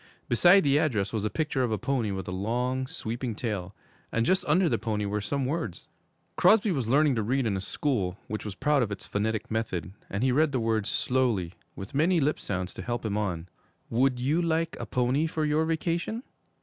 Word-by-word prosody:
Beside 175 - +6
the 145 0 +4
address 115 - 0
was 110 -2 -1
a - - +1
picture 150 0 -1
of 125 -3 0
a 110 - +1
pony 120 0 -1
with 95 -2 -4
a - - -3
long, 125 +7 -1
sweeping 120 -5 -4
tail, 105 -5 -4 0.4
and 115 0 +1
just 185 +6 +2
under 175 +4 +4
the - - +1
pony 105 -1 -1
were 105 +1 -1
some 140 +5 -1
words. 135 - -3 0.5
Crosby 215 -1 +5
was 135 -9 -1
learning 145 +3 +4
to 115 - 0
read 125 +5 0
in 105 -3 0
a 95 - -2
school 100 -5 -1
which 105 +1 -4
was 105 -3 -6
proud 145 +6 +2
of 110 -4 -1
its 100 - -5
'phonetic 110 +2 -2
method,' 100 -7 -2 0.2
and 100 +4 -2
he 130 - +3
read 145 +2 +3
the 130 - +1
words 110 -2 0
slowly, 120 -9 0 0.2
with 95 +7 -8
many 160 +6 +3
little 150 -3 +3
lip - - -4
sounds 95 -2 -3
to - - -7
help 120 -1 -3
him 105 -2 -1
on. 90 -5 -2 0.4
'Would 125 +2 +2
you 145 +7 +1
like 165 -1 0
a - - -5
pony 130 +5 +1
for 155 -1 -1
your 150 +1 +2
vacation? 170 +8 -1
125 Hz, 215 wpm, -28 LUFS, 105-150 Hz, 0.5 s, Beside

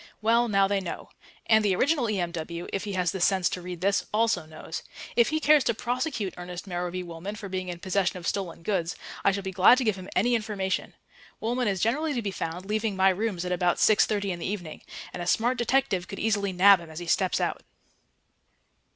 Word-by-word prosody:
Well, 230 +2 +3
now 195 -3 +3
they 200 0 +1
know. 185 -3 -6 0.4
And 220 -1 +4
the 195 -3 +2
original 275 - +2
E.M.W., 170 -3 -3
if 195 - -2
he 205 - -4
has 180 -2 +1
the 190 - -5
sense 185 0 +3
to 180 - -4
read 175 -1 -7
this, 200 +1 +2
also 215 -7 +1
knows. 155 +1 -7 0.3
If 235 -1 +4
he 310 +1 0
cares 300 -2 +5
to 235 - +1
prosecute 245 - -2
Ernest 180 +1 -7
Merrowby 180 -1 -3
Woolman 175 +4 -7
for 210 -1 -7
being 185 0 -3
in 175 - -5
possession 190 0 0
of 175 - -9
stolen 170 -3 -3
goods, 175 -3 -1 0.3
I 200 - +5
shall 200 0 -3
be 190 - -4
glad 190 +6 +6
to 260 - +1
give 215 -4 +1
him 185 0 -9
any 240 +6 +3
information. 210 -4 -2 0.4
Woolman 245 +2 -1
is 195 -3 0
generally 290 +6 +1
to 240 - -1
be 200 - -2
found 175 0 -5
leaving 215 0 -1
my 190 0 +5
rooms 190 -2 -1
at 180 - -3
about 180 -1 +1
6.30 205 -2 +3
in 175 - -5
the - - -5
evening, 180 -5 -5 0.3
and 180 - -5
a 175 - -4
smart 240 +6 +2
detective 240 -7 +1
could 195 - -7
easily 205 -2 0
nab 190 +1 +6
him 170 -1 -11
as 160 - -10
he 175 - -5
steps 185 +3 +1
out. - - -1
195 Hz, 220 wpm, -27 LUFS, 180-220 Hz, 0.4 s, glad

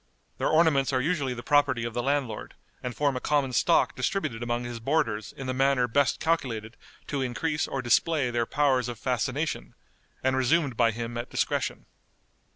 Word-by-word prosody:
Their - - +1
ornaments 155 -5 +3
are 130 - +2
usually 140 -3 0
the 120 - -7
property 145 -5 +3
of 115 -1 -4
the 120 - -1
landlord, 135 -4 -2 0.3
and 125 -1 -5
form 145 -2 +1
a - - -1
common 140 -2 0
stock 170 - +3
distributed 125 - -2
among 120 0 -1
his 120 -1 -5
boarders 115 -5 0
in 135 - -8
the 130 - -1
manner 135 -1 +2
best 135 +2 +2
calculated 125 -9 -1 0.3
to 140 -2 -2
increase 150 +5 -1
or 135 -1 -3
display 125 +3 +2
their 120 -1 0
powers 130 -4 +2
of 120 - -5
fascination, 130 +6 -2 0.5
and 130 0 +2
resumed 130 +1 +2
by 115 0 +4
him 115 +1 -4
at 120 - -5
discretion. - - -1
130 Hz, 175 wpm, -27 LUFS, 120-145 Hz, 0.5 s, by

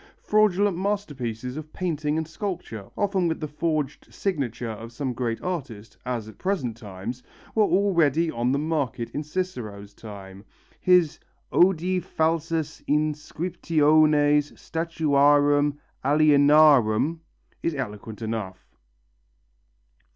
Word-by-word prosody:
Fraudulent 205 -2 +2
masterpieces 140 - -3
of 155 0 -8
painting 155 -4 -1
and 160 -1 -2
sculpture, 160 - -5
often 195 -3 +1
with 160 - -2
the 155 - -3
forged 150 -1 -2
signature 125 - -2
of 115 +2 -8
some 130 0 -3
great 120 -1 -2
artist, 130 - -5
as 120 -4 -3
at 110 - -13
present 165 - -1
times, 110 +2 -7 0.3
were 215 -1 +4
already 170 -6 +2
on 120 +2 0
the 140 - +2
market 140 -6 -2
in 145 - -3
Cicero's 125 - -5
time. 100 -2 -11 0.4
His 180 -4 +3 0.3
"Odi 180 0 +3
falsas 165 -2 -1
inscriptiones 150 -1 +2
statuarum 145 -3 +2 0.3
alienarum" 145 -2 +5 0.4
is 165 - -1
eloquent 110 -3 -6
enough. 110 -4 -4
150 Hz, 105 wpm, -25 LUFS, 120-165 Hz, 0.4 s, alienarum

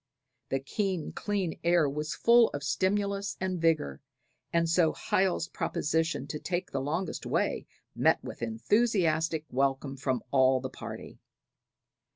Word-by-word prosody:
The 135 - 0
keen 185 +4 -2
clear 200 -5 -2
air 170 -3 +4
was 150 +2 -3
full 235 0 +5
of 140 - -5
stimulus 200 +6 0
and 185 -2 -2
vigor; 155 - +1 0.5
and 170 0 +2
so 165 -1 +3
Hiel's 185 -3 0
proposition 160 -3 -1
to 150 +1 -5
take 180 +2 -3
the 135 - -1
longest 160 +6 -3
way - - -1 0.3
met - - +4
with - - -8
enthusiastic 160 - +1
welcome 135 +1 0
from 130 -2 -1
all 130 -1 +4
the 130 0 -5
party. - - -8
160 Hz, 135 wpm, -29 LUFS, 140-185 Hz, 0.5 s, full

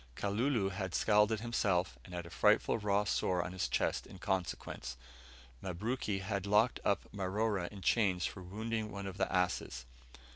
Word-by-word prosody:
Kalulu 105 +1 +1
had 95 -2 -3
scalded 105 +1 +4
himself, 95 - 0
and 90 - -9
had 85 -1 -4
a 85 - -10
frightful 115 - +3
raw 100 -1 +2
sore 90 -3 +1
on 85 - -5
his 95 -1 -1
chest - - 0
in - - -11
consequence. 90 -9 -3 0.6
Mabruki 100 +2 -2
had 100 0 -2
locked 105 +4 +4
up 100 - +1
Marora 100 -1 0
in 100 -2 -9
chains 95 -4 +3
for 95 - -4
wounding 110 +4 -3
one 100 -1 -5
of 95 -1 -6
the - - +1
asses. 90 -9 0
100 Hz, 160 wpm, -34 LUFS, 90-105 Hz, 0.6 s, scalded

